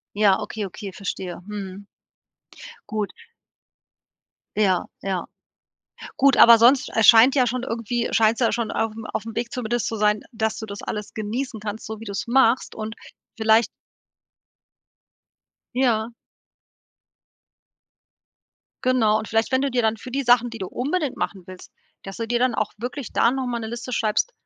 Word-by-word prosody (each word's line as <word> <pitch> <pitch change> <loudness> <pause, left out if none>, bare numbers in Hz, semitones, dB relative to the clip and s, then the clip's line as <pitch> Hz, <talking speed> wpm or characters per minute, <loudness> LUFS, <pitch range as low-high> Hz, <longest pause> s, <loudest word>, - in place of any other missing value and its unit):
Ja, 205 -2 +4
okay, 215 -2 -5
okay, 195 +1 -8
verstehe. 185 -3 -5
Mhm. 200 -1 -7 1.0
Gut. 215 -2 -2 1.4
Ja, 190 -4 +2 0.2
ja. 190 -2 -2 0.9
Gut, 275 -1 +4
aber 235 0 +9
sonst, 250 +4 +4
äh, 225 - +3
scheint 230 +5 +8
ja 255 -3 +3
schon 250 +1 -2
irgendwie 235 -1 -2
scheinst 225 +1 +3
du 240 - +4
ja - - 0
schon 230 -2 -2
auf 225 -1 -1 0.2
auf'm 225 +1 -4
Weg 235 0 -3
zumindest 240 -1 -2
zu 225 - -3
sein, 210 0 +2
dass 220 -1 -1
du 220 - -6
das 200 0 -8
alles 210 -1 -5
genießen 225 +2 -4
kannst, 215 +1 -6
so 220 -1 -7
wie - - -8
du's 200 -2 -4
machst 245 0 +3
und 220 0 -5 0.4
vielleicht 220 +1 +4 2.1
Ja. 235 -3 +1 2.7
Genau 230 -4 +3
und 220 - -6
vielleicht 225 +4 0
wenn 260 - +3
du 275 0 0
dir 245 -1 +1
dann 220 0 +1
für 255 - -9
die 275 +2 -1
Sachen, 245 -1 +4
die 230 - -8
du 190 - -4
unbedingt 290 - -2
machen 195 -2 -3
willst, 185 -1 -12 0.3
dass 195 -1 -8
du 230 - -3
dir 240 +1 0
dann 255 -1 +1
auch 215 -2 -1
wirklich 245 +3 -6
da 235 - +3
noch 265 0 -2
mal 240 -1 -2
'ne 220 - -5
Liste 235 +2 -6
schreibst: 225 - 0
225 Hz, 160 wpm, -23 LUFS, 210-245 Hz, 2.7 s, aber